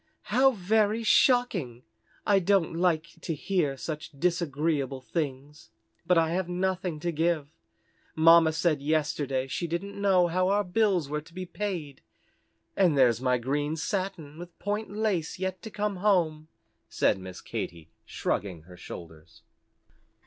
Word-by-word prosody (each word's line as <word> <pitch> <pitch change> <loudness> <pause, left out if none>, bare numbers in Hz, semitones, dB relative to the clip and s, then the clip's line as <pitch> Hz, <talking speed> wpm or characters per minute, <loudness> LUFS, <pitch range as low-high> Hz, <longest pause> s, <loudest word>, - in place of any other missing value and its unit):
"How 265 +2 +6
very 215 +2 +1
shocking! 210 - +2 0.4
I 200 -2 +4
don't 190 -3 +2
like 165 -2 +1
to 165 - -3
hear 150 -4 -1
such 155 +3 -5
disagreeable 150 -5 0
things. 145 -2 -5 0.4
But 180 - +4
I 165 -1 +3
have 180 0 -1
nothing 180 -2 -2
to 175 0 -1
give. 160 -2 0 0.7
Mamma 165 0 +6
said 155 -2 +1
yesterday 145 -3 0
she 170 +6 -3
didn't 175 +5 -4
know 190 -3 +4
how 185 +2 +1
our 205 +2 +2
bills 190 -4 +1
were 150 +1 -3
to 155 - -19
be 185 0 -4
paid, 175 -8 -5 0.7
and 175 -7 +3
there's 120 -3 +4
my 125 -1 +2
green 145 +5 -1
satin 170 -4 -4
with 175 0 -10
point 210 +2 -3
lace 205 -6 -1
yet 190 0 -3
to 220 - -7
come 210 -2 -2
home," 170 -6 +1 0.4
said 100 - +1
Miss 95 -1 -9
Katy, 80 -1 -6
shrugging 90 -6 -3
her 90 +1 -14
shoulders. 80 -2 -11
165 Hz, 140 wpm, -28 LUFS, 145-190 Hz, 0.7 s, How